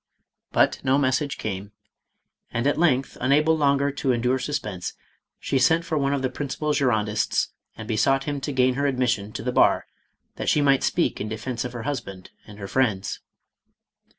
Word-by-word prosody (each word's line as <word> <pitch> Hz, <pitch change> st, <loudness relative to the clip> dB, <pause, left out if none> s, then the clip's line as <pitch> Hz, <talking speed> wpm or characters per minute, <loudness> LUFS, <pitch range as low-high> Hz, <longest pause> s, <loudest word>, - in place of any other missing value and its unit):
But -, -, +2 dB
no 135 Hz, 0 st, +3 dB
message 140 Hz, +1 st, 0 dB
came, 100 Hz, 0 st, -5 dB, 0.8 s
and 120 Hz, +2 st, -2 dB
at 145 Hz, +2 st, +2 dB
length 135 Hz, -6 st, +1 dB
unable 150 Hz, +5 st, +3 dB
longer 140 Hz, -2 st, +2 dB
to 135 Hz, -1 st, -1 dB
endure 125 Hz, +2 st, +1 dB
suspense, 105 Hz, -9 st, -4 dB, 0.5 s
she 135 Hz, -, 0 dB
sent 165 Hz, +4 st, +3 dB
for 165 Hz, -2 st, -2 dB
one 140 Hz, -2 st, +1 dB
of 140 Hz, -1 st, -1 dB
the 130 Hz, -, +1 dB
principal 145 Hz, +3 st, -2 dB
Girondists, 110 Hz, -7 st, +1 dB, 0.3 s
and 110 Hz, -, -8 dB
besought 135 Hz, +5 st, +2 dB
him 145 Hz, -1 st, -3 dB
to 145 Hz, -, -3 dB
gain 130 Hz, -1 st, +3 dB
her 140 Hz, +2 st, 0 dB
admission 120 Hz, -6 st, 0 dB
to -, -, -5 dB
the 125 Hz, -, -1 dB
bar -, -, +3 dB, 0.5 s
that -, -, -1 dB
she -, -, +3 dB
might 140 Hz, -2 st, +4 dB
speak -, -, 0 dB
in 105 Hz, -, -3 dB
defence 115 Hz, +2 st, -4 dB
of 125 Hz, -, -5 dB
her 120 Hz, -2 st, -6 dB
ljusband 105 Hz, -9 st, -5 dB, 0.2 s
and 105 Hz, -1 st, -12 dB
her 100 Hz, -1 st, -6 dB
friends. 105 Hz, -6 st, 0 dB
130 Hz, 180 wpm, -24 LUFS, 110-140 Hz, 0.8 s, might